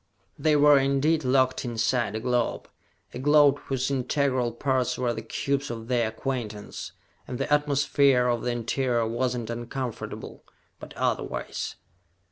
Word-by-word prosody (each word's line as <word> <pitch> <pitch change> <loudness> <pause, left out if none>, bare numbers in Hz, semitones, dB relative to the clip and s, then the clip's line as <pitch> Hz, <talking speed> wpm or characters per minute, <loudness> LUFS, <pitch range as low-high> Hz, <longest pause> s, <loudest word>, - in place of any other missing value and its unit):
They 155 -1 +3
were 145 -1 +6
indeed 140 +4 +2
locked 130 0 +2
inside 120 -2 0
a - - -1
globe, 125 0 -1 0.5
a - - -6
globe 145 0 +5
whose 135 0 -1
integral 130 -2 0
parts 130 +1 0
were 125 -2 0
the 110 - -5
cubes 140 +5 -2
of 115 0 -6
their 120 -3 +2
acquaintance; 110 -3 -5 0.3
and 125 - -4
the 145 - 0
atmosphere 140 -3 +3
of 120 -2 0
the 125 - -2
interior 120 0 0
was 120 +2 -1
not 120 -2 -4
uncomfortable, 120 +1 -6 0.4
but - - -11
otherwise. - - -2
125 Hz, 140 wpm, -26 LUFS, 120-140 Hz, 0.5 s, were